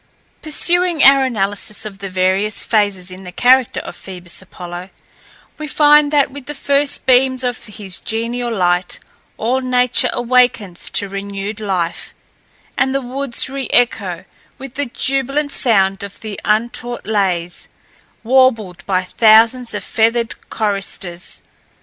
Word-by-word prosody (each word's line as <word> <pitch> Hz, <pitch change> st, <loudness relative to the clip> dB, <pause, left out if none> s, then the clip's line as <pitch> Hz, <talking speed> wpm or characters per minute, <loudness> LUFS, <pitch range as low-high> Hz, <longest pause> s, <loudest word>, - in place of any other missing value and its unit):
Pursuing 345 Hz, +1 st, +2 dB
our 275 Hz, 0 st, +7 dB
analysis 205 Hz, -3 st, -2 dB
of 200 Hz, -2 st, -8 dB
the 195 Hz, -1 st, -6 dB
various 190 Hz, +3 st, +1 dB
phases 200 Hz, -4 st, +1 dB
in 185 Hz, +1 st, -10 dB
the 180 Hz, -, -9 dB
character 250 Hz, +5 st, +3 dB
of -, -, -9 dB
Phoebus 180 Hz, -2 st, -8 dB
Apollo, 180 Hz, 0 st, -9 dB, 0.7 s
we 305 Hz, -, -5 dB
find 295 Hz, 0 st, +4 dB
that 285 Hz, -3 st, +2 dB
with 280 Hz, -1 st, -10 dB
the 295 Hz, -, -5 dB
first 280 Hz, +1 st, +1 dB
beams 260 Hz, 0 st, +3 dB
of 245 Hz, -1 st, -3 dB
his 200 Hz, -3 st, -5 dB
genial 235 Hz, +2 st, -3 dB
light, 180 Hz, -3 st, 0 dB, 0.4 s
all 250 Hz, +4 st, 0 dB
nature 250 Hz, -1 st, +2 dB
awakens 245 Hz, -7 st, +1 dB
to 200 Hz, -, -1 dB
renewed 200 Hz, +2 st, -6 dB
life, 185 Hz, -5 st, -3 dB, 0.6 s
and 265 Hz, 0 st, 0 dB
the 275 Hz, -, 0 dB
woods 260 Hz, 0 st, -1 dB
re 270 Hz, -1 st, -5 dB
echo 190 Hz, -7 st, +1 dB, 0.3 s
with 270 Hz, -2 st, -10 dB
the 285 Hz, +1 st, -3 dB
jubilant 275 Hz, +4 st, -1 dB
sound 195 Hz, -8 st, +2 dB
of 200 Hz, 0 st, -9 dB
the 215 Hz, -2 st, -6 dB
untaught 240 Hz, +3 st, -2 dB
lays, 185 Hz, -5 st, -1 dB, 0.6 s
warbled 230 Hz, -7 st, +2 dB
by 185 Hz, -2 st, +1 dB
thousands 225 Hz, +5 st, +4 dB
of -, -, -4 dB
feathered 230 Hz, +1 st, 0 dB, 0.2 s
choristers. 195 Hz, -4 st, -4 dB
225 Hz, 135 wpm, -17 LUFS, 195-260 Hz, 0.7 s, our